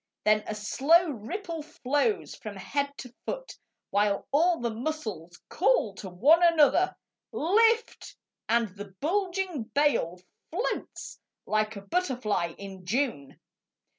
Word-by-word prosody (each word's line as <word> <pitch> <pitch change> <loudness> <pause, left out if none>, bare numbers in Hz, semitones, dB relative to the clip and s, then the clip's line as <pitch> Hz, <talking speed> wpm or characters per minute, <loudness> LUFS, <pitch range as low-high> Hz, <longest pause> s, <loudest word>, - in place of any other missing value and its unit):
Then 215 0 +3
a 215 - -3
slow 295 +11 +3
ripple 325 - -5
flows 290 - -1
along 215 -2 -6 0.5
the 250 -2 -13
body, - - -5 0.4
While 205 0 +1
all 335 +5 +3
the 235 -1 -1
muscles 220 - -5
call 230 - +2
to 190 - -7
one 275 - +5
another: 335 +1 +4 0.3
" - - -63 0.2
Lift! 455 +1 +2 0.2
" - - -59
and 230 -1 +2
the 200 0 -11
bulging 365 - -1
bale 235 - +2 0.3
Floats - - -4 0.3
like 215 0 0
a 200 - -7
butterfly 215 - -1
in 195 -2 -9
June. 205 - -2
250 Hz, 125 wpm, -28 LUFS, 205-335 Hz, 0.5 s, one